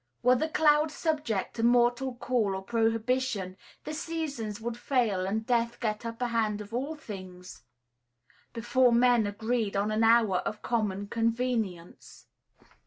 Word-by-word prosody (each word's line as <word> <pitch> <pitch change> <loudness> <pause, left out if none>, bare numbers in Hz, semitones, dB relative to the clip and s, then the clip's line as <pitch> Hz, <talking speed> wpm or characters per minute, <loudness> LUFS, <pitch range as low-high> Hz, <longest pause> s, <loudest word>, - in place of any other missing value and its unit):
Were 250 +1 +6
the 310 +6 0
clouds 305 0 +3
subject 295 - -1
to - - -1
mortal 245 +2 +3
call 235 -5 0
or 190 - -5
prohibition, 225 -2 0 0.3
the 305 - -5
seasons 295 -10 -4
would 230 +1 -4
fail 230 -8 0
and 220 +3 -2
death 235 0 0
get 215 0 -2
upper 230 +2 -3
hand 225 -3 0
of 210 +1 -9
all 275 +6 -2
things 185 -9 -10 0.9
before 245 +2 +2
men 240 -2 +4
agreed 220 0 -2
on 205 +2 0
an 215 +1 +1
hour 225 -4 +4
of 210 - -5
common 205 -4 -1
convenience. 225 -5 -3
230 Hz, 140 wpm, -28 LUFS, 210-250 Hz, 0.9 s, Were